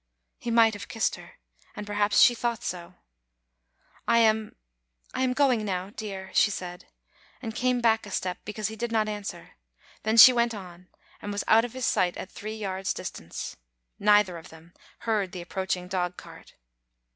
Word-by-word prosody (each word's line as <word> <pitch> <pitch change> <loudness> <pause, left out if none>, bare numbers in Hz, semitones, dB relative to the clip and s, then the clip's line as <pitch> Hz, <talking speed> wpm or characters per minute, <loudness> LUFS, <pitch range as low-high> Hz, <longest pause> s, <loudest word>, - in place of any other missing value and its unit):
He - - -5
might 230 -1 +5
have 205 - -7
kissed 225 - 0
her, - - -10 0.4
and 210 - -6
perhaps 205 0 +2
she 245 - +8
thought 235 -1 -2
so. 175 0 -5 1.1
"I 230 - +4
am 220 -1 +2 0.3
— - - -34
I - - -2
am 255 -1 +2
going 255 -5 +2
now, 190 -1 -3
dear," 195 -3 -7
she - - +5
said, 180 -3 -6 0.5
and 225 -3 -6
came 250 +1 +1
back 225 -2 +2
a - - -8
step 180 -2 -3
because 210 -1 -3
he 220 - -7
did 235 +1 -4
not 220 -1 +1
answer; 205 -5 -6 0.5
then 220 +1 0
she 255 +3 +11
went 235 -1 +1
on, 180 -2 -11 0.3
and 205 - -5
was 205 - -2
out 225 +1 +5
of 245 - -8
his 260 -2 -3
sight 175 -1 +1
at 190 - -7
three 215 +1 -6
yards' 195 -3 -3
distance. 85 - -7 0.4
Neither 205 -4 +4
of 165 - -14
them 160 +2 -16 0.3
heard 210 -5 -1
the 180 - -5
approaching 185 0 -3
dogcart. 180 -1 -5
205 Hz, 180 wpm, -27 LUFS, 185-225 Hz, 1.1 s, she